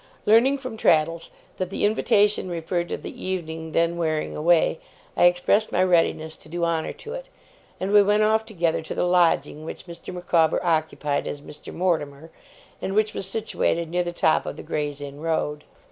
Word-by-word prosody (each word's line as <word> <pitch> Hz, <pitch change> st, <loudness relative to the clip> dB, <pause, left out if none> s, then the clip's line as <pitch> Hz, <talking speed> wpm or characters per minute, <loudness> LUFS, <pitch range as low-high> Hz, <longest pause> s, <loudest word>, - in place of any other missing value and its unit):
Learning 235 Hz, +6 st, +5 dB
from 255 Hz, -4 st, -7 dB
Traddles 165 Hz, -3 st, +2 dB, 0.3 s
that 185 Hz, -1 st, -2 dB
the 195 Hz, -, -1 dB
invitation 205 Hz, -2 st, +2 dB
referred 175 Hz, +1 st, -2 dB
to -, -, -2 dB
the -, -, -9 dB
evening 160 Hz, -3 st, -4 dB
then 170 Hz, +1 st, +1 dB
wearing 155 Hz, -2 st, -1 dB
away, 165 Hz, +1 st, +3 dB, 0.4 s
I -, -, +4 dB
expressed 180 Hz, +5 st, +3 dB
my 180 Hz, -, +2 dB
readiness 165 Hz, -3 st, +1 dB
to -, -, -17 dB
do 170 Hz, +1 st, -1 dB
honour 165 Hz, -1 st, -1 dB
to 445 Hz, -, -9 dB
it; -, -, -7 dB, 0.5 s
and 190 Hz, +2 st, -2 dB
we 205 Hz, 0 st, +7 dB
went 205 Hz, +1 st, +3 dB
off 220 Hz, +1 st, +3 dB
together 175 Hz, -8 st, -1 dB
to 160 Hz, -, -6 dB
the -, -, +1 dB
lodging 175 Hz, -3 st, +2 dB
which 160 Hz, -, -8 dB
Mr. 170 Hz, 0 st, -9 dB
Micawber 170 Hz, -3 st, +2 dB
occupied 155 Hz, -3 st, 0 dB
as 145 Hz, -, -5 dB
Mr. 150 Hz, 0 st, -11 dB
Mortimer, 160 Hz, -3 st, -2 dB, 0.5 s
and 195 Hz, -, -3 dB
which 215 Hz, 0 st, +2 dB
was 190 Hz, -, -3 dB
situated 170 Hz, -6 st, -1 dB
near 180 Hz, +1 st, +1 dB
the 175 Hz, 0 st, -3 dB
top 165 Hz, -2 st, +2 dB
of -, -, -5 dB
the -, -, -8 dB
Gray's 145 Hz, -1 st, -3 dB
Inn 140 Hz, 0 st, -8 dB
Road. 150 Hz, -2 st, -2 dB
170 Hz, 185 wpm, -24 LUFS, 160-195 Hz, 0.5 s, we